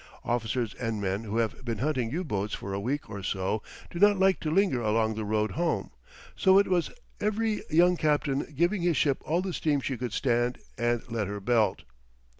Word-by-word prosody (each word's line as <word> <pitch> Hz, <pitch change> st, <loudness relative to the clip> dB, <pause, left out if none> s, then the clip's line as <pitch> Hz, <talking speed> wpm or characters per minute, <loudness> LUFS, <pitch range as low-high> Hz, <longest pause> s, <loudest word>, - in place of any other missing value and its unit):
Officers 120 Hz, -1 st, -1 dB
and 115 Hz, -3 st, -3 dB
men 100 Hz, +2 st, -2 dB
who 110 Hz, +1 st, -3 dB
have 115 Hz, +2 st, -1 dB
been 115 Hz, -3 st, -3 dB
hunting 130 Hz, -2 st, 0 dB
U 170 Hz, +9 st, -2 dB
boats 105 Hz, -, -2 dB
for 100 Hz, -, -6 dB
a 100 Hz, -, -1 dB
week 135 Hz, +8 st, -2 dB
or 100 Hz, -1 st, -6 dB
so 95 Hz, +3 st, -1 dB, 0.3 s
do 170 Hz, -, -5 dB
not 205 Hz, +1 st, +6 dB
like 190 Hz, 0 st, +3 dB
to 155 Hz, -, -2 dB
linger 165 Hz, -7 st, +2 dB
along 110 Hz, 0 st, +1 dB
the 110 Hz, 0 st, -4 dB
road 105 Hz, +1 st, 0 dB
home; 170 Hz, +1 st, -1 dB, 0.4 s
so 190 Hz, 0 st, +5 dB
it 200 Hz, -, +5 dB
was 180 Hz, -3 st, +1 dB, 0.3 s
every 215 Hz, +1 st, 0 dB
young 175 Hz, +2 st, +4 dB
captain 150 Hz, -2 st, 0 dB
giving 175 Hz, +4 st, +2 dB
his 170 Hz, -4 st, +2 dB
ship 140 Hz, -1 st, +2 dB
all 170 Hz, +4 st, 0 dB
the 190 Hz, -2 st, -3 dB
steam 150 Hz, -3 st, +1 dB
she 135 Hz, -1 st, -3 dB
could 120 Hz, -1 st, -4 dB
stand 120 Hz, -1 st, +1 dB, 0.2 s
and 120 Hz, -1 st, 0 dB
let 110 Hz, -4 st, -1 dB
her 100 Hz, +1 st, -4 dB
belt. 110 Hz, +1 st, +1 dB
125 Hz, 205 wpm, -28 LUFS, 110-170 Hz, 0.4 s, not